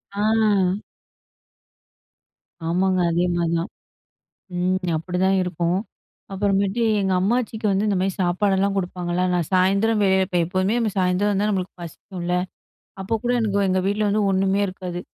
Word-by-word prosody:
ஆ. 205 - -1 2.4
ஆமாங்க. 185 +2 +1
அதே 175 +2 +1
மாரிதான். 170 +2 -1 0.9
ம். 185 +1 +1 0.2
அப்படிதான் 185 +3 0
இருக்கும். 175 +1 -1 0.5
அப்புறமேட்டு 200 +2 0 0.2
எங்க 190 -1 0
அம்மாச்சிக்கு 220 +1 -1
வந்து 195 +2 +1
இந்த 200 - +1
மாதிரி 190 0 0
சாப்பாடெல்லாம் 195 +2 +1
குடுப்பாங்கல்ல? 180 -1 -2
நான் 175 -3 0
சாயந்தரம் 200 +4 +3
வெப் 190 -1 +2
போ - - +3
எப்போவுமே 185 +4 0 0.2
சாயந்தரம் 185 +2 +2
வந்து 205 +2 +1
நம்மளுக்கு 185 -2 -2
பசிக்கும்ல? 175 +1 -5 0.7
அப்போ 195 +4 -3
கூட 245 - +1
எனக்கு 205 -3 0
எங்க 185 0 +2
வீட்ல 205 +2 0
வந்து 210 +1 +1
ஒண்ணுமே 195 +1 +1
இருக்காது. 180 -1 -6
190 Hz, 125 wpm, -22 LUFS, 180-200 Hz, 2.4 s, சாயந்தரம்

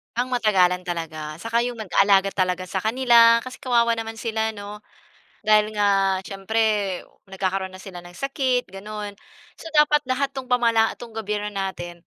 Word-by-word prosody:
Pangmatagalan 210 -7 +1
talaga. 160 -3 -5
Saka 230 +1 0
yung 245 - -4
nag-alaga 195 -2 +3
talaga 185 -1 -1
sa 190 - -1
kanila, 230 +1 +5
kasi 255 +1 -9
kawawa 235 -3 +2
naman 225 0 -5
sila 220 -1 -2
'no. 205 0 -8 0.6
Dahil 215 0 +4
nga, 195 -2 +2
siyempre, 195 +3 -4 0.7
nagkakaroon 190 0 -3
na 185 - -11
sila 185 -3 -9
ng 175 - -12
sakit 260 - -1
gano'n, 205 +1 -7 0.4
so - - -11
dapat 300 0 +4
lahat 265 +2 0
'tong 265 -2 -7
pamala 230 -3 +2
'tong 240 -1 -11
gobyerno 210 -1 -3
natin, 185 -4 -6
210 Hz, 150 wpm, -23 LUFS, 195-235 Hz, 0.7 s, kanila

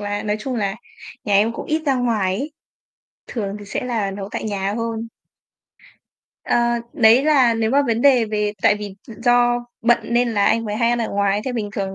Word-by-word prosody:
là 205 0 -3
nói 210 0 -1
chung 260 +2 -4
là 200 -2 -1 0.5
nhà 205 - 0
em 215 +3 +3
cũng - - -7
ít 310 +1 -1
ra 275 - +3
ngoài 215 -7 0
ấy, 295 +3 -5 0.7
thường 205 -4 -4
thì 205 - -10
sẽ 205 +5 -4
là 220 -5 -1
nấu 195 0 -6
tại - - -4
nhà 200 -1 -2
hơn. 230 0 -3 1.4
Ờ, - - +1 0.4
đấy 230 +3 +5
là 265 -7 +4
nếu 225 0 0
mà 285 +1 +4
vấn 230 0 0
đề 260 -5 +5
về 210 -1 -1
tại - - +5
vì 205 -2 -7
do 240 +1 +1 0.2
bận 240 0 +4
nên 240 +1 +1
là 205 -2 +2
anh 230 0 +2
mới 210 -1 -3
hay 230 +1 +2
ăn 240 - +1
ở 225 - -1
ngoài. 200 0 0
Thế 260 - -3
bình 215 -4 -3
thường 195 -1 -3
225 Hz, 210 wpm, -20 LUFS, 205-240 Hz, 1.4 s, đấy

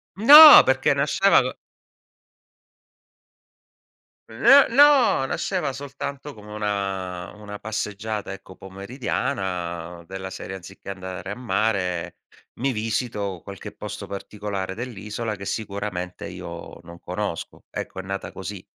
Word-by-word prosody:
No, 295 +9 +11
perché 130 +1 +2
nasceva 150 +8 +3
co - - -5 2.7
N 280 +1 +6
no! 270 - +5
Nasceva 175 -1 -2
soltanto 140 +1 -7
come 105 -1 -12
una 95 -4 -3
una 105 -1 -9
passeggiata, 105 -1 -4
ecco, 95 -1 -11
pomeridiana, 95 -5 -4
della 95 0 -6
serie 95 +1 -7
anziché 95 +1 -11
andare 95 0 -7
a - - -4
mare, 100 -6 -2 0.4
mi 135 +1 +1
visito 110 -4 -3
qualche 100 -2 -9
posto - - -7
particolare 100 -1 -5
dell'isola 110 -2 -5
che 100 - -10
sicuramente 100 -4 -5
io 85 0 -9
non 85 0 -13
conosco. 90 -2 -5
Ecco, 95 - -6
è - - -2
nata 95 0 -5
così. 95 0 -8
100 Hz, 110 wpm, -23 LUFS, 95-120 Hz, 2.7 s, No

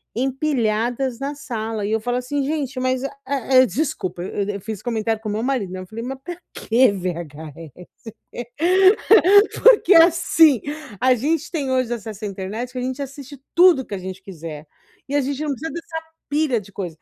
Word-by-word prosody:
empilhadas 250 -2 -1
na 280 +1 -3
sala, 225 -6 -4
e - - -3
eu 220 - +1
falo 245 +2 -2
assim: 275 +3 -2
“Gente, 280 -3 -3
mas, 255 0 0
eh-eh 270 -2 +2
"desculpa, 190 - -3
e 200 +2 -3
eu 200 - -6
fiz 215 0 -6
o - - -29
comentário 225 -2 -1
com 220 - -6
meu 210 +1 -2
marido, 245 -7 -1
né, 185 - -5
eu 185 - -9
falei: 225 +4 -7
“Mas 260 +2 -5
pra 350 +3 -6 0.2
que 240 +1 +3
VHS?". 165 -4 -6 1.9
Porque 425 -6 +6
assim, 330 -5 +5 0.4
a 255 0 +5
gente 305 +5 -1
tem 290 -6 -2
hoje 255 -2 0
acesso 220 -2 -7
à - - -1
internet, 200 +6 -5
que 255 - -9
a - - -3
gente 260 +2 -3
assiste 275 0 -9
tudo 345 -6 +6
que - - -9
a - - -2
gente 185 0 -7
quiser, 160 -5 -8 0.4
e 285 - -2
a - - +4
gente 280 +1 -3
não 305 - -2
precisa 290 +3 -5
dessa 325 -1 -6 0.3
pilha 290 -6 +1
de 200 0 -16
coisa. 180 -5 -6
250 Hz, 185 wpm, -21 LUFS, 210-280 Hz, 1.9 s, Porque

